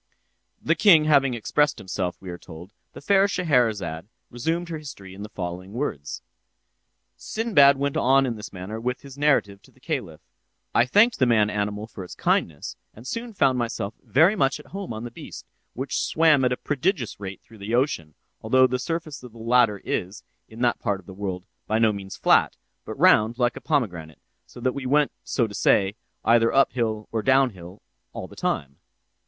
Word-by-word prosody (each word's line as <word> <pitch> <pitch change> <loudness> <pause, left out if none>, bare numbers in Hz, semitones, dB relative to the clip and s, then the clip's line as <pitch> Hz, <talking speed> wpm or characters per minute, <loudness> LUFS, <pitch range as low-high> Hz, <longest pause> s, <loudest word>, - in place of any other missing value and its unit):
The - - +1
king 175 -8 +6
having 140 -4 +4
thus - - -3
expressed 145 +6 +1
himself, 90 -2 -4
we 95 -2 -8
are 85 - -7
told, 85 +5 -12 0.2
the - - -10
fair 195 +5 +4
Scheherazade 110 - 0 0.2
resumed 165 +8 -2
her 160 -2 -4
history 100 -11 -10
in 100 - -10
the 105 - -7
following 90 +1 -6
words: 75 - -4 0.9
"Sinbad 145 -12 +3
went 140 0 -1
on 135 +2 +4
in 120 -3 -2
this 105 -1 -9
manner 95 +4 -6
with 125 +1 -3
his 135 -2 -12
narrative—'I 120 -3 -2
thanked 225 - +4
the 130 - +4
man 105 -3 +3
animal 105 0 -2
for 105 -3 -9
its 90 - -10
kindness, 75 -3 -1 0.2
and 115 - -13
soon 230 - -5
found 135 -7 +2
myself 115 -3 -3
very 165 +10 +4
much 140 -6 +1
at 150 - -13
home 195 -5 -5
on 110 0 -5
the 120 - -6
beast, - - -10 0.3
which 135 +3 -2
swam 155 -4 +3
at 125 - +2
a 125 - 0
prodigious 145 - -2
rate 95 -2 -8
through 110 -2 -17
the 105 +4 -2
ocean; 85 - -1 0.3
although 130 +4 +4
the 125 0 -1
surface 165 0 -4
of 125 -3 -12
the - - -14
latter 115 -2 +3
is, 95 +4 -3 0.3
in 110 +2 -10
that 120 -1 +2
part 100 -4 -1
of 95 - -18
the 95 - -10
world, 95 -2 -5 0.2
by 110 - +1
no 110 -1 +3
means 95 -1 -8
flat, - - +3 0.3
but - - -7
round 110 +2 +4
like 120 -2 +1
a - - -8
pomegranate, 90 - -2 0.3
so - - -13
that 130 +1 0
we 135 -2 -5
went—so 140 -3 +1
to 105 - -8
say—either 115 +4 +1
up 135 0 +4
hill 110 -3 -2
or 115 - -1
down 130 +2 +3
hill 90 0 -13 0.3
all - - -6
the - - -15
time. 70 0 -2
120 Hz, 185 wpm, -24 LUFS, 100-140 Hz, 0.9 s, king